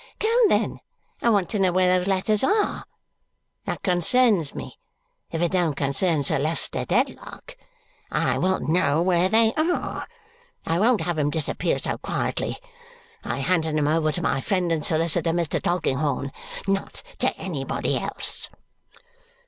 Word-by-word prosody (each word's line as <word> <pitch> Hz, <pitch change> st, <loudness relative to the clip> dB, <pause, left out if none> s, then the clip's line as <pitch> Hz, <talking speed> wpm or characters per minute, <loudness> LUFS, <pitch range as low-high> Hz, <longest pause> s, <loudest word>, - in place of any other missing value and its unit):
Come, 455 Hz, 0 st, +3 dB
then, -, -, +1 dB, 0.4 s
I 235 Hz, -, +3 dB
want 200 Hz, -5 st, +2 dB
to 210 Hz, -, -1 dB
know 190 Hz, -2 st, +3 dB
where 185 Hz, 0 st, +3 dB
those 180 Hz, +1 st, 0 dB
letters 200 Hz, +3 st, +1 dB
are. 415 Hz, +8 st, +1 dB, 0.8 s
That -, -, -4 dB
concerns 185 Hz, -, +3 dB
me, -, -, -8 dB, 0.5 s
if 165 Hz, +1 st, -2 dB
it 170 Hz, -, +1 dB
don't 175 Hz, -6 st, +1 dB
concern 145 Hz, +3 st, +1 dB
Sir 150 Hz, +1 st, +1 dB
Leicester 155 Hz, +4 st, -1 dB
Dedlock. -, -, -2 dB, 0.5 s
I -, -, 0 dB
will 190 Hz, +1 st, +1 dB
know 155 Hz, -1 st, +2 dB
where 180 Hz, 0 st, +2 dB
they 225 Hz, +2 st, +4 dB
are. 325 Hz, +3 st, -1 dB, 0.6 s
I 165 Hz, +1 st, 0 dB
won't 230 Hz, +2 st, +3 dB
have 175 Hz, -3 st, -2 dB
'em 145 Hz, -1 st, +2 dB
disappear 155 Hz, -1 st, -1 dB
so -, -, -3 dB
quietly. -, -, -2 dB, 0.7 s
I -, -, -3 dB
handed 160 Hz, -4 st, +1 dB
'em 145 Hz, -1 st, +1 dB
over 155 Hz, 0 st, +2 dB
to -, -, -3 dB
my 135 Hz, -, 0 dB
friend 180 Hz, -1 st, 0 dB
and 160 Hz, -2 st, 0 dB
solicitor, 165 Hz, 0 st, +1 dB
Mr. 170 Hz, -3 st, -1 dB
Tulkinghorn, 145 Hz, -5 st, -1 dB, 0.4 s
not 195 Hz, 0 st, -2 dB, 0.2 s
to -, -, 0 dB
anybody -, -, -2 dB
else." -, -, -4 dB
175 Hz, 150 wpm, -24 LUFS, 155-195 Hz, 0.8 s, they